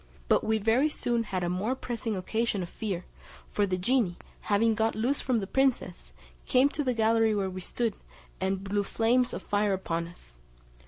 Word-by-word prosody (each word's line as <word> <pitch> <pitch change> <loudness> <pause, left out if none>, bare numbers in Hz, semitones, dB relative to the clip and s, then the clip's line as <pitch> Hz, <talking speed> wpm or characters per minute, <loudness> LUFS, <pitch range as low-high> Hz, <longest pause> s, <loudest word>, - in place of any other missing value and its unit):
But - - +3
we 220 0 +2
very 225 +8 +3
soon 240 -5 0
had 190 -5 -3
a - - 0
more 195 +8 -1
pressing 230 -4 -3
occasion 215 +1 -1
of 175 - -7
fear, 190 -5 -4 0.5
for 205 -1 +1
the 185 -1 0
genie 205 -2 +1 0.2
having 220 +2 +2
got 220 +1 +1
loose 245 +6 0
from 255 -2 +1
the 205 - -1
princess, 235 - 0 0.4
came 260 +2 +5
to 295 0 -2
the 255 -2 0
gallery 225 0 +3
where 195 -2 -1
we 185 0 -6
stood, 230 +4 -1 0.5
and 190 0 -1
blew 200 +1 0
flames 235 +4 +2
of - - -5
fire 205 0 +1
upon 170 -3 -2
us. - - -13
220 Hz, 190 wpm, -29 LUFS, 190-235 Hz, 0.5 s, came